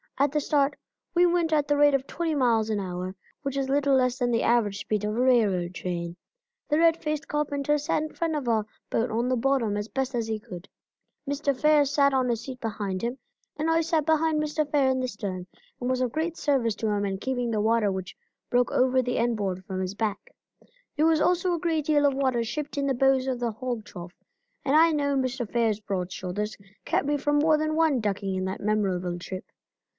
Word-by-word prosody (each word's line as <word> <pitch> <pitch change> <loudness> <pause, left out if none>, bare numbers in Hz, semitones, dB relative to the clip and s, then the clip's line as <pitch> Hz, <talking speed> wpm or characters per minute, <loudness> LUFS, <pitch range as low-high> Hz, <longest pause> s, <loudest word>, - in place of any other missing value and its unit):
At 280 0 +2
the 300 - +1
start 285 -1 +1 0.4
we 350 +1 +5
went 340 -2 +2
at 295 -2 +2
the 290 - +2
rate 290 0 +5
of 270 -1 -1
twenty 325 +1 -2
miles 230 -5 +2
an 215 -2 0
hour, 185 0 -4 0.3
which 275 -2 -3
is 270 -1 0
a - - 0
little 280 -1 +3
less 255 -1 +2
than 245 -2 0
the 230 - +1
average 215 -4 +2
speed 210 -1 -2
of 210 +1 -1
a - - -1
railroad 210 -9 +2
train. 170 -2 -4 0.5
The 300 - +2
red 330 0 +4
faced 305 -1 -3
carpenter 295 0 0
sat 295 +1 0
in 310 - -6
front 330 -2 -1
of 285 -4 -3
our 220 -2 +2 0.3
boat 230 +2 +1
on 235 +3 0
the 255 - +2
bottom 240 -4 +1
as 205 +1 -3
best 265 +2 -2
he 225 -2 -2
could. 180 -3 -10 0.6
Mr. 280 -1 -1
Fair 300 -1 +5
sat 280 0 +3
on 260 -2 +2
a 235 - +2
seat 255 +3 -8
behind 205 -5 -3
him, 240 +3 -2 0.4
and 310 +2 0
I 325 0 +3
sat 320 -2 0
behind 315 -1 +2
Mr. 305 0 -1
Fair 280 -3 +3
in 260 0 +1
the 255 - -1
stern 195 -5 -5 0.3
and 245 - -2
was 255 0 0
of 250 -2 0
great 320 +3 -2
service 250 -7 +1
to 220 - -2
him 205 -1 0
in 195 -1 -2
keeping 245 +2 -2
the 215 -2 0
water 220 -1 +2
which 190 -1 -5 0.3
broke 245 0 +2
over 260 0 +3
the 250 0 -2
end 235 -1 +1
board, 190 -3 -3
from 190 -2 -4
his 185 +1 -3
back. 215 - -3 0.7
There 305 - +3
was 320 -1 +3
also 360 +1 +2
a 340 - -1
great 320 -3 0
deal 295 -1 +3
of 280 - +1
water 260 -4 +1
shipped 290 +6 -5
in 280 - 0
the 270 -1 +1
bows 270 +1 +3
of 255 -2 -1
the 240 -1 -1
hog 235 0 -4
trough, 175 -1 -9 0.5
and 280 - +2
I 325 +1 +6
know 285 -2 0
Mr. 255 -3 -1
Fair's 225 -3 +1
broad 190 -3 -3
shoulders 205 +4 -4 0.3
kept - - 0
me 290 0 +1
from 290 +1 +1
more 310 +1 +4
than 310 0 -1
one 315 -5 +3
ducking 200 -2 -2
in 185 0 -2
that 190 +1 -4
memorable 190 -4 0
trip. 185 +1 -7
255 Hz, 230 wpm, -26 LUFS, 210-295 Hz, 0.7 s, I